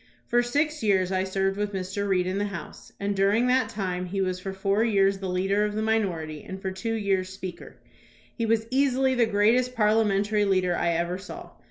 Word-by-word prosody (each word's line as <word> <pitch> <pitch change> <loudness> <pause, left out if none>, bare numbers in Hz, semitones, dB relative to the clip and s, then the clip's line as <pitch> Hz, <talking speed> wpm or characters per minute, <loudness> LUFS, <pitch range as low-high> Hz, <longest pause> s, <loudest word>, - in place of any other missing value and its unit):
For 240 0 +2
six 300 +5 0
years 190 -4 +2
I 185 0 +1
served 195 +1 -1
with 205 0 -2
Mr. 190 +2 -3
Reed 185 -2 +2
in 185 +2 -2
the 205 - 0
House, 195 -4 -9
and 200 0 -1
during 200 +5 +3
that 250 -2 +2
time 185 -4 -3
he 195 +2 -3
was 185 -1 -1
for 195 +1 -5
four 195 +2 0
years 195 -3 +2
the 190 -1 -4
leader 195 +3 +1
of 210 0 -2
the 215 - -1
minority 175 -9 -1
and 190 0 -7
for 190 0 -3
two 225 +5 -3
years 195 -3 0
Speaker. 185 -2 -8 0.6
He 230 -2 -1
was 225 0 +1
easily 265 -1 +2
the 240 -3 +3
greatest 230 +4 +2
parliamentary 210 -1 +2
leader 185 -3 +2
I 170 - 0
ever 170 +2 -1
saw. 195 - -9
200 Hz, 205 wpm, -26 LUFS, 190-220 Hz, 0.6 s, during